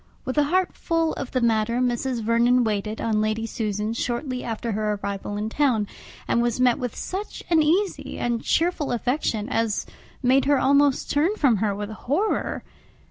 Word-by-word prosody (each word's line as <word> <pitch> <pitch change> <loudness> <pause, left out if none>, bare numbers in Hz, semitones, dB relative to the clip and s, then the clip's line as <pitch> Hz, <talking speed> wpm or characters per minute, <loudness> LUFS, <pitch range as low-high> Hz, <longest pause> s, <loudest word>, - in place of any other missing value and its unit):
With 260 - -3
a 290 - +4
heart 365 +4 +1
full 330 -2 0
of 270 - -5
the 255 - -1
matter, 230 0 +2
Mrs. 245 -1 -1
Vernon 235 +2 +3
waited 215 0 -2
on 215 -2 +1
Lady 215 +1 -1
Susan 215 -1 -2
shortly 250 +2 -3
after 230 0 -3
her 210 0 0
arrival 200 0 -4
in 210 +1 -2
town, 235 -3 +1 0.4
and 235 - +2
was 240 0 0
met 250 -2 +3
with 245 -3 -4
such 390 +3 -5
an 325 -2 +5
easy 360 +6 0
and 235 -1 -1
cheerful 330 -3 +1
affection, 240 -3 -1
as 225 -4 0 0.4
made 260 +2 +4
her 285 0 +4
almost 280 0 +3
turn 320 +8 +2
from 265 - +3
her 205 0 0
with 205 +1 -5
horror. 295 - -1
240 Hz, 175 wpm, -24 LUFS, 220-285 Hz, 0.4 s, an